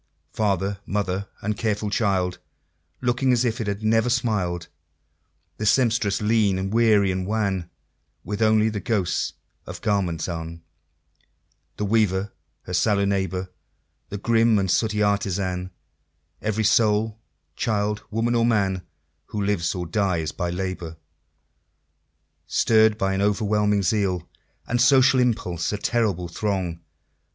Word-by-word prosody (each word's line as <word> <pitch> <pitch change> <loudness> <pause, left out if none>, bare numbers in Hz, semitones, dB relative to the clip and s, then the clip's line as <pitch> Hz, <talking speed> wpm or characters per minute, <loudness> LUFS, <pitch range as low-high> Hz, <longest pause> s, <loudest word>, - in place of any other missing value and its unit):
Father, 100 -2 0
mother, 100 -1 -2 0.2
and 105 +2 -1
careful 105 -1 -1
child, 95 -5 0 0.6
Looking 125 +1 +1
as 125 0 +2
if 120 +1 -1
it 110 - -3
had 100 +1 -3
never 115 +2 +2
smiled 105 -9 -1 0.9
The 105 - -3
Sempstress, 115 -4 +2
lean, 105 -3 +2
and 95 +2 -3
weary, 110 -4 +4
and 95 0 -3
wan, 100 -5 -1 0.5
With 105 +1 -4
only 110 0 +4
the 105 -1 -3
ghosts 100 -6 -1 0.3
of - - -8
garments 90 -6 0
on 85 -1 -6 1.1
The 105 - -1
Weaver, 100 -2 +1 0.3
her 90 - -7
sallow 100 +2 +2
neighbor, 95 -2 -1 0.6
The 100 - -4
grim 115 +1 +3
and 95 -2 +1
sooty 105 -2 +1
Artisan; 95 -3 -1 0.7
Every 110 0 -1
soul 110 0 +2 0.4
child, 105 -1 -1
woman, 115 +2 0
or 115 -1 +2
man, 100 -5 +1 0.5
Who 105 -2 -3
lives 95 -3 0
or 90 -1 -3
dies 85 -4 0
by 90 +1 -3
labor. 90 -2 -4 1.5
Stirr'd 110 -1 +3
by 95 -1 0
an 95 - -1
overwhelming 105 0 +1
zeal, 95 -2 0 0.4
And 120 +1 0
social 135 0 +5
impulse, 90 -9 0
a 105 - -2
terrible 100 -6 0
throng! 90 -2 -2
105 Hz, 130 wpm, -24 LUFS, 95-110 Hz, 1.5 s, social